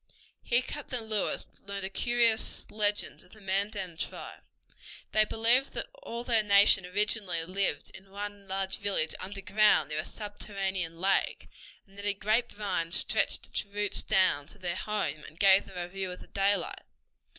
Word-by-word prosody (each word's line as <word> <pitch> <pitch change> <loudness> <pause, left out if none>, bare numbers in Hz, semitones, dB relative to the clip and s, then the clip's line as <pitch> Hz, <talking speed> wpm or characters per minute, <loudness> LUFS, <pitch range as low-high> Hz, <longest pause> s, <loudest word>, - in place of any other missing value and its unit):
Here 240 +1 +2
Captain 255 -5 -4
Lewis 215 -2 0 0.2
learned 200 0 -5
a - - -3
curious 235 +1 +1
legend 210 -1 +1
of - - -16
the 215 - -15
Mandan 195 -2 -2
tribe. - - -6 0.7
They 215 0 +4
believed 235 +5 +3
that - - -3
all 235 +1 -5
their 230 -3 +3
nation 200 -2 +5
originally 195 -3 0
lived 185 -4 -1
in 195 0 -14
one 205 0 -7
large 190 0 -2
village 195 -6 0
underground 205 +1 +2
near 150 0 -2
a - - -1
subterranean 195 -5 -4
lake, 195 +2 +1 0.4
and 195 0 -16
that 200 - -6
a 205 -1 +1
grape 220 +4 +1
vine 195 -5 -2
stretched - - +2
its - - -3
roots 205 0 -1
down 185 -8 +2
to 210 - -12
their 175 -3 -3
home 185 -8 -2
and 155 - -13
gave 195 -1 +6
them 190 - -11
a 175 0 -3
view 190 +1 -4
of 180 - -11
daylight. 200 -2 +1
200 Hz, 160 wpm, -29 LUFS, 190-210 Hz, 0.7 s, gave